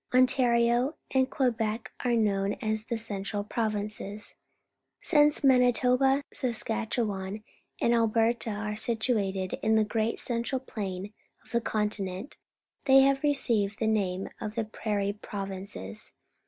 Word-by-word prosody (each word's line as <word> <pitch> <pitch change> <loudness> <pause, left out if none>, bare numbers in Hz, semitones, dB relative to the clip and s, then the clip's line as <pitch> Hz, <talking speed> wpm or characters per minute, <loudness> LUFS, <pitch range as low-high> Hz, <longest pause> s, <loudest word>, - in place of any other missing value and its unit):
Ontario 250 +1 +3 0.2
and 260 0 +2
Quebec 230 -4 -1
are 245 -1 +2
known 200 -3 +1
as 220 0 -2
the 235 - -1
Ce 225 0 -4
ntral 205 +1 -3
Prov 220 -2 -1
in 205 0 -1
ces. 205 0 -6 0.7
Since 295 -3 +3
Ma)iitoba, 255 +1 +4
Saskatcheican, 220 -4 -2 0.4
and 235 - +3
^4/ 230 -2 +3
berta 230 +1 +1
are 210 0 -3
situated 215 -5 -1
in 220 0 +3
the 220 - +4
great 220 +1 -1
central 240 +2 -1
plain 200 -5 -5 0.3
of - - -20
the 235 - +1
continent, 210 +1 -2 0.5
thej' 270 0 +7
ha\e 290 +2 0
received 215 -7 +1
the 225 - -1
name 195 -4 0
of 215 0 -5
the 230 - 0
Prair 210 -1 -2
ie 200 - 0
Prov 200 -1 -6
inces. 105 - -7
220 Hz, 140 wpm, -28 LUFS, 205-245 Hz, 0.7 s, thej